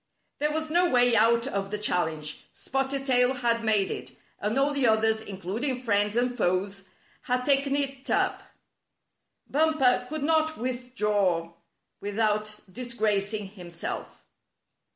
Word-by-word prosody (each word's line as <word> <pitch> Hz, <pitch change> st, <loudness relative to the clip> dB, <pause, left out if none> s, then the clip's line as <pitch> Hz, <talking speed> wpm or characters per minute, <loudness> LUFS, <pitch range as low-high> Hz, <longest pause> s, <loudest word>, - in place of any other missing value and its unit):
There 300 Hz, +1 st, +1 dB
was 315 Hz, 0 st, -2 dB
no 350 Hz, +1 st, +4 dB
way 245 Hz, -1 st, +4 dB
out 230 Hz, +2 st, +4 dB
of 200 Hz, -7 st, -2 dB
the 210 Hz, -, -2 dB
challenge. 160 Hz, -7 st, -2 dB
Spotted 270 Hz, +1 st, -2 dB
Tail 250 Hz, 0 st, +3 dB
had 235 Hz, -2 st, +1 dB
made 210 Hz, -3 st, +2 dB
it, -, -, -6 dB, 0.3 s
and 210 Hz, +5 st, -1 dB
all 280 Hz, +2 st, +2 dB
the 275 Hz, -4 st, +2 dB
others, 220 Hz, 0 st, +3 dB
in 200 Hz, -3 st, -8 dB
cluding 235 Hz, +9 st, -2 dB
friends 205 Hz, -2 st, +1 dB
and 245 Hz, +1 st, +1 dB
foes, 195 Hz, -1 st, -1 dB, 0.4 s
had 250 Hz, 0 st, 0 dB
taken 275 Hz, -1 st, +2 dB
it 275 Hz, -1 st, -2 dB
up. -, -, +1 dB, 1.1 s
Bumper 285 Hz, -5 st, +2 dB
could 310 Hz, -2 st, -3 dB
not 315 Hz, +1 st, +2 dB
withdraw 210 Hz, -9 st, 0 dB, 0.5 s
without 210 Hz, 0 st, -1 dB
disgracing 215 Hz, -4 st, -1 dB
himself. 175 Hz, -4 st, -7 dB
235 Hz, 130 wpm, -27 LUFS, 205-270 Hz, 1.1 s, no